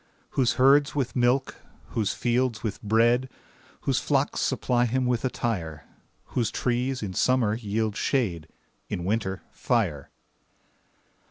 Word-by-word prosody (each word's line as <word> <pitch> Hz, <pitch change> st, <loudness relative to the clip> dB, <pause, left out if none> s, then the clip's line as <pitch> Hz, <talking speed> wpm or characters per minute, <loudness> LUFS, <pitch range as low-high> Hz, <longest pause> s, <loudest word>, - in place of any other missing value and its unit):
Whose 125 Hz, -3 st, +2 dB
herds 140 Hz, +3 st, +4 dB
with 135 Hz, -4 st, -1 dB
milk, 125 Hz, +2 st, +1 dB, 0.3 s
whose 105 Hz, -3 st, 0 dB
fields 120 Hz, -2 st, 0 dB
with 105 Hz, -4 st, -3 dB
bread, 120 Hz, +4 st, +3 dB, 0.5 s
Whose -, -, +1 dB
flocks -, -, 0 dB
supply 120 Hz, -1 st, +1 dB
him 130 Hz, +2 st, 0 dB
with 125 Hz, -2 st, 0 dB
attire; 90 Hz, -, -3 dB, 0.5 s
Whose 120 Hz, -5 st, +1 dB
trees 125 Hz, 0 st, -1 dB
in 95 Hz, -3 st, -4 dB
summer 125 Hz, +1 st, +2 dB
yield 110 Hz, -1 st, -2 dB
shade, 95 Hz, -, -1 dB, 0.4 s
In 85 Hz, -, -3 dB
winter, 95 Hz, -2 st, -1 dB
fire. 90 Hz, -, -1 dB
120 Hz, 120 wpm, -26 LUFS, 105-125 Hz, 0.5 s, herds